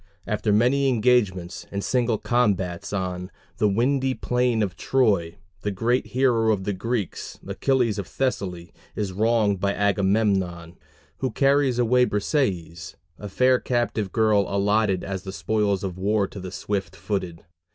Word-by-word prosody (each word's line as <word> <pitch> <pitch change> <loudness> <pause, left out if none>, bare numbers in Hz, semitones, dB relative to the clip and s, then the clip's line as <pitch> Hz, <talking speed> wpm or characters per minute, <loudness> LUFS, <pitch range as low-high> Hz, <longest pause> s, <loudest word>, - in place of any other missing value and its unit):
After 105 0 -1
many 130 +6 +3
engagements 105 -7 +1
and 100 0 -4
single 120 -3 +1
combats 105 -6 0
on 90 -2 -3 0.3
"the 105 - +3
windy 130 +5 +1
plain 125 -3 +1
of 95 -4 -3
Troy" 100 -11 +1 0.3
the 105 - -1
great 115 +6 0
hero 120 -4 +2
of 100 -3 -1
the 100 - -1
Greeks, 105 +1 -4
Achilles 125 -6 0
of 100 - -5
Thessaly, 90 -10 -3 0.2
is 105 -3 -2
wronged 105 -1 +2
by 100 +1 0
Agamemnon, 95 -4 0 0.4
who 130 - -1
carries 135 -2 +2
away 125 +1 +4
Briseis, 100 - -2 0.2
a 105 - -7
fair 130 +5 +3
captive 120 -5 -1
girl 105 -2 +3
allotted 100 -1 +1
as 95 -1 -4
the 95 0 -7
spoils 100 -1 0
of 95 -1 -4
war 100 +1 +1
to 100 - -9
the 95 -1 -7
"Swift 100 0 -3
footed." 90 -5 -4
105 Hz, 145 wpm, -24 LUFS, 95-120 Hz, 0.4 s, away